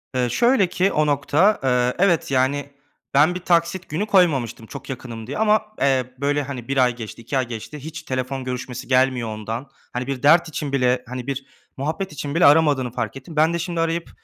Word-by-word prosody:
Iıı, 125 Hz, -1 st, +1 dB
şöyle 235 Hz, -, +3 dB
ki 185 Hz, +3 st, +1 dB
o 155 Hz, -, +2 dB
nokta, 150 Hz, +8 st, +2 dB
eee, 125 Hz, -1 st, +2 dB
evet, 170 Hz, -7 st, +1 dB
yani, 135 Hz, +2 st, +1 dB, 0.4 s
ben 155 Hz, +6 st, +4 dB
bir -, -, -3 dB
taksit 170 Hz, +1 st, 0 dB
günü 165 Hz, +8 st, -1 dB
koymamıştım 140 Hz, -, +2 dB
çok -, -, -10 dB
yakınım 120 Hz, -4 st, -7 dB
diye 140 Hz, -, -4 dB
ama, 215 Hz, 0 st, +3 dB, 0.2 s
eee, 130 Hz, -2 st, +1 dB
böyle, 145 Hz, +1 st, 0 dB
hani, 130 Hz, -4 st, -7 dB
1 135 Hz, 0 st, -2 dB
ay 125 Hz, -2 st, +3 dB
geçti, 115 Hz, -1 st, -8 dB
2 135 Hz, +4 st, -2 dB
ay 130 Hz, -, 0 dB
geçti. 120 Hz, +6 st, -7 dB
Hiç 160 Hz, +3 st, -8 dB
telefon 130 Hz, 0 st, -3 dB
görüşmesi 125 Hz, 0 st, -5 dB
gelmiyor 130 Hz, -2 st, +2 dB
ondan. 110 Hz, +5 st, -5 dB, 0.2 s
Hani, 125 Hz, +1 st, -3 dB
bir 135 Hz, -2 st, -4 dB
dert 165 Hz, +3 st, +5 dB
için 145 Hz, -2 st, -4 dB
bile, 125 Hz, -2 st, +1 dB
hani, 125 Hz, +1 st, -6 dB
bir 135 Hz, -1 st, -3 dB, 0.3 s
muhabbet 155 Hz, +7 st, -3 dB
için 145 Hz, 0 st, -5 dB
bile 170 Hz, -, +4 dB
aramadığını 145 Hz, -4 st, +4 dB
fark 120 Hz, -1 st, -3 dB
ettim. 135 Hz, +5 st, -11 dB
Ben 160 Hz, +2 st, +3 dB
de 170 Hz, -, -1 dB
şimdi 170 Hz, 0 st, -3 dB
arayıp, 165 Hz, +1 st, -1 dB
140 Hz, 200 wpm, -22 LUFS, 125-165 Hz, 0.4 s, dert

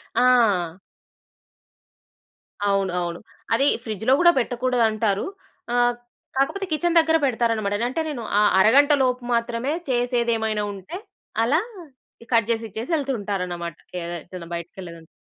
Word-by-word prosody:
ఆ! 205 Hz, -9 st, +3 dB, 1.9 s
అవును. 195 Hz, -2 st, +1 dB
అవును. 170 Hz, -1 st, -4 dB, 0.3 s
అదీ 275 Hz, +4 st, +3 dB, 0.2 s
ఫ్రిడ్జ్‌లో 220 Hz, +3 st, -1 dB
గూడా 345 Hz, 0 st, +7 dB
పెట్టకూడదంటారు. 230 Hz, -5 st, +1 dB, 0.5 s
ఆహ్, 245 Hz, 0 st, +3 dB, 0.4 s
కాకపోతే 375 Hz, +9 st, 0 dB
కిచెన్ 340 Hz, +2 st, +2 dB
దగ్గర 320 Hz, 0 st, +3 dB
పెడతారనమాట. 225 Hz, -5 st, 0 dB
అంటే, 260 Hz, -, -2 dB
నేను 275 Hz, -6 st, -4 dB, 0.2 s
ఆ -, -, +4 dB, 0.2 s
అరగంట 280 Hz, +8 st, +6 dB
లోపు 250 Hz, -1 st, 0 dB
మాత్రమే 235 Hz, +3 st, -1 dB, 0.2 s
చేసేదేమైనా 235 Hz, -3 st, 0 dB
ఉంటే, 195 Hz, -, -8 dB, 0.5 s
అలా 295 Hz, +8 st, +3 dB, 0.6 s
ఇ -, -, -26 dB
కట్ 230 Hz, -1 st, +3 dB
జేసిచ్చేసి 225 Hz, -, -3 dB
యెళ్తూ 275 Hz, -3 st, -1 dB
ఉంటారనమాట. 180 Hz, -4 st, -3 dB, 0.2 s
కే 180 Hz, -, -4 dB, 0.2 s
ఎటన్నా 170 Hz, -1 st, -10 dB
బయటకెళ్ళేదుంటే. 170 Hz, -1 st, -8 dB
230 Hz, 115 wpm, -23 LUFS, 200-255 Hz, 1.9 s, గూడా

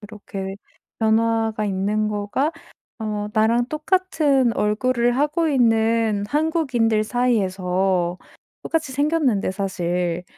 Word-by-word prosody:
그렇게 200 Hz, -2 st, -7 dB, 0.4 s
변화가 225 Hz, -1 st, +1 dB
있는 205 Hz, +2 st, 0 dB
거가 210 Hz, +9 st, -1 dB, 0.5 s
어 210 Hz, -1 st, -3 dB
나랑 230 Hz, +3 st, +2 dB
똑같은 305 Hz, -6 st, +1 dB
얼굴을 240 Hz, +3 st, +1 dB
하고 300 Hz, +4 st, +1 dB
있는 225 Hz, -5 st, +2 dB
한국인들 270 Hz, -9 st, +1 dB
사이에서 190 Hz, -6 st, 0 dB, 0.4 s
똑같이 315 Hz, -5 st, -2 dB
생겼는데 285 Hz, -, +1 dB
사실 180 Hz, -2 st, -2 dB
225 Hz, 230 characters per minute, -22 LUFS, 200-260 Hz, 0.5 s, 나랑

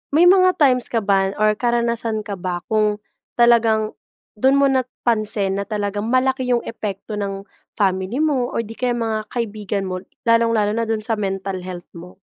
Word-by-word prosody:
may 335 Hz, -, +6 dB
mga 370 Hz, 0 st, +6 dB
times 255 Hz, -4 st, +3 dB
ka 225 Hz, -3 st, -1 dB
ba 195 Hz, -1 st, +1 dB
or 215 Hz, 0 st, +3 dB
karanasan 235 Hz, -2 st, 0 dB
ka 200 Hz, -3 st, -6 dB
ba 175 Hz, -1 st, -3 dB
kung 210 Hz, -1 st, +1 dB, 0.3 s
talagang 230 Hz, -2 st, +3 dB, 0.5 s
dun 265 Hz, +3 st, +4 dB
mo 280 Hz, 0 st, +4 dB
napansin 215 Hz, -6 st, 0 dB
na 200 Hz, -, -4 dB
talagang 205 Hz, 0 st, -2 dB
malaki 260 Hz, +1 st, +1 dB
yung 245 Hz, -1 st, +1 dB
epekto 210 Hz, -1 st, -5 dB
ng 195 Hz, -1 st, -4 dB, 0.3 s
family 195 Hz, +8 st, 0 dB
mo, 265 Hz, -6 st, +1 dB
or 230 Hz, -, 0 dB
'di 225 Hz, +1 st, -11 dB
kaya 245 Hz, -1 st, 0 dB
mga 220 Hz, -2 st, -2 dB
kaibigan 210 Hz, -4 st, -3 dB
mo? 185 Hz, -1 st, -3 dB, 0.2 s
Lalong-lalo 230 Hz, -2 st, +3 dB
na 230 Hz, +1 st, -1 dB
dun 220 Hz, -1 st, -1 dB
sa 220 Hz, -1 st, -1 dB
mental 195 Hz, -1 st, -3 dB
health 175 Hz, -1 st, -7 dB
mo? 175 Hz, +1 st, -12 dB
220 Hz, 170 wpm, -20 LUFS, 200-240 Hz, 0.5 s, may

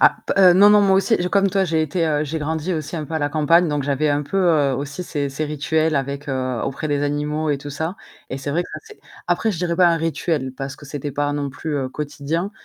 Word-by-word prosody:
Ah, -, -, +5 dB, 0.2 s
heu, 185 Hz, -2 st, +7 dB
non, 200 Hz, +3 st, +7 dB
non 210 Hz, 0 st, +6 dB
moi 195 Hz, -1 st, +4 dB
aussi 225 Hz, +4 st, +3 dB
comme 200 Hz, 0 st, +3 dB
toi 195 Hz, -1 st, +2 dB
j'ai 160 Hz, -2 st, +1 dB
été, 155 Hz, -1 st, 0 dB
j'ai 160 Hz, +3 st, -3 dB
grandi 160 Hz, +3 st, -2 dB
aussi 160 Hz, +1 st, -4 dB
un 155 Hz, -, -3 dB
peu 160 Hz, +2 st, -7 dB
à -, -, +1 dB
la 145 Hz, -1 st, 0 dB
campagne 160 Hz, +3 st, +3 dB
donc 145 Hz, -1 st, -1 dB
j'avais 140 Hz, +2 st, 0 dB
un 145 Hz, 0 st, +1 dB
peu 160 Hz, -3 st, +2 dB
aussi 140 Hz, +5 st, -4 dB
ces 145 Hz, -4 st, -2 dB
ces 140 Hz, +3 st, -3 dB
rituels 155 Hz, +2 st, 0 dB
avec 140 Hz, +1 st, -3 dB, 0.4 s
auprès 135 Hz, +3 st, -3 dB
des 145 Hz, -1 st, 0 dB
animaux 150 Hz, +2 st, -1 dB
et 145 Hz, -, 0 dB
tout 145 Hz, +1 st, -8 dB
ça 160 Hz, +5 st, -3 dB, 0.4 s
et 135 Hz, -, -3 dB
c'est 135 Hz, +1 st, -4 dB
vrai 165 Hz, +5 st, +1 dB
que -, -, -12 dB
c'est 435 Hz, -1 st, -15 dB, 0.3 s
après 220 Hz, -, +1 dB
je 170 Hz, -, -5 dB
dirais 170 Hz, -1 st, -1 dB
pas 180 Hz, 0 st, +5 dB
un 170 Hz, -1 st, +4 dB
rituel 160 Hz, -4 st, -1 dB
parce 135 Hz, +1 st, -5 dB
que 145 Hz, -, -13 dB
c'était 145 Hz, 0 st, -5 dB
pas 145 Hz, +1 st, -1 dB
non 145 Hz, -1 st, -2 dB
plus 140 Hz, -1 st, -3 dB
quotidien, 150 Hz, +6 st, -3 dB
150 Hz, 240 wpm, -21 LUFS, 145-170 Hz, 0.4 s, heu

